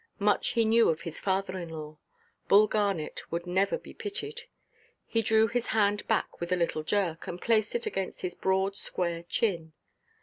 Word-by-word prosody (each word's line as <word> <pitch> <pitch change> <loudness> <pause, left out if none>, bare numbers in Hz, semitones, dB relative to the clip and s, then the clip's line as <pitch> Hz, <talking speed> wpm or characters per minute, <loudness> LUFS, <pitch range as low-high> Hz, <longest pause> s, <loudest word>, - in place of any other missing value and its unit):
Much 205 -1 +2
he 230 -2 +3
knew 230 +1 +5
of 160 -1 0
his 165 -2 -6
father–in–law! 180 -6 -3 0.5
Bull 205 +2 +7
Garnet 200 -7 -1
would 170 +1 -2
never 190 +3 +1
be - - -13
pitied. 425 +4 -5 0.6
He 230 - +1
drew 220 0 +4
his 235 +1 -1
hand 205 -1 +1
back - - -1
with 170 +1 -3
a - - +4
little 170 -2 0
jerk, 165 -1 -1
and 175 - -5
placed 220 - +1
it 475 0 0
against 195 - -3
his 180 -1 -3
broad, 190 +2 0
square 170 -3 -2
chin. 170 -3 -1
195 Hz, 170 wpm, -29 LUFS, 170-220 Hz, 0.6 s, Bull